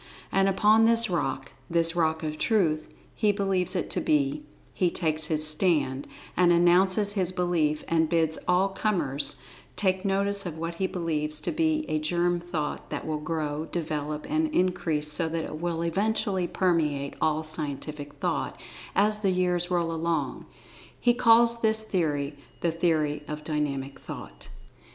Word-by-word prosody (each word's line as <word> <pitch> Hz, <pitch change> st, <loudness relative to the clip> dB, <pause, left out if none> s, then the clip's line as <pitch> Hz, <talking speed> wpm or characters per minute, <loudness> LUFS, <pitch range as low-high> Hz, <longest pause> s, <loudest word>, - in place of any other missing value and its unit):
And 195 Hz, 0 st, +3 dB
upon 215 Hz, +3 st, +4 dB
this 230 Hz, -2 st, +4 dB
rock—this 165 Hz, +1 st, -1 dB
rock 160 Hz, -1 st, +1 dB
of 155 Hz, 0 st, -4 dB
Truth, 170 Hz, -9 st, +1 dB, 0.2 s
he 215 Hz, -2 st, +2 dB
believes 195 Hz, -3 st, -1 dB
it -, -, -2 dB
to -, -, -1 dB
be—he 295 Hz, -, -1 dB
takes 155 Hz, -3 st, +1 dB
his 155 Hz, -1 st, +4 dB
stand, 150 Hz, -4 st, +2 dB, 0.3 s
and 175 Hz, -1 st, +4 dB
announces 185 Hz, +4 st, +3 dB
his 185 Hz, -3 st, 0 dB
belief, 175 Hz, -4 st, 0 dB
and 160 Hz, -1 st, +2 dB
bids 160 Hz, -2 st, +1 dB
all 185 Hz, +2 st, +3 dB
comers 160 Hz, -10 st, 0 dB, 0.4 s
take 190 Hz, -2 st, 0 dB
notice 200 Hz, 0 st, 0 dB
of 160 Hz, -2 st, -6 dB
what 165 Hz, +1 st, -3 dB
he 190 Hz, -, +2 dB
believes 155 Hz, -4 st, -2 dB
to -, -, -2 dB
be 315 Hz, -1 st, +1 dB
a 155 Hz, -, 0 dB
germ 175 Hz, +3 st, +1 dB
thought 165 Hz, -4 st, -4 dB
that -, -, -4 dB
will 155 Hz, -1 st, -2 dB
grow, 155 Hz, -1 st, -3 dB
develop, 150 Hz, -3 st, -3 dB
and 315 Hz, +2 st, +1 dB
increase 175 Hz, -, 0 dB
so 160 Hz, +2 st, 0 dB
that 165 Hz, 0 st, -2 dB
it 155 Hz, -, -7 dB
will 170 Hz, -1 st, -2 dB
eventually 190 Hz, +1 st, 0 dB
permeate 150 Hz, -7 st, 0 dB
all 155 Hz, 0 st, +1 dB
Scientific 150 Hz, -1 st, -4 dB
Thought -, -, -2 dB, 0.4 s
as 210 Hz, +1 st, +2 dB
the 200 Hz, -2 st, +1 dB
years 180 Hz, -1 st, +1 dB
roll 170 Hz, -2 st, 0 dB
along. 165 Hz, -4 st, -2 dB, 0.5 s
He 240 Hz, -, +3 dB
calls 235 Hz, -1 st, +4 dB
this 220 Hz, 0 st, +3 dB
theory 150 Hz, -8 st, -1 dB, 0.3 s
"The 170 Hz, -, +1 dB
Theory 155 Hz, -3 st, 0 dB
of 150 Hz, 0 st, -6 dB
Dynamic 140 Hz, -3 st, -3 dB
Thought." -, -, -9 dB
170 Hz, 150 wpm, -27 LUFS, 155-195 Hz, 0.5 s, upon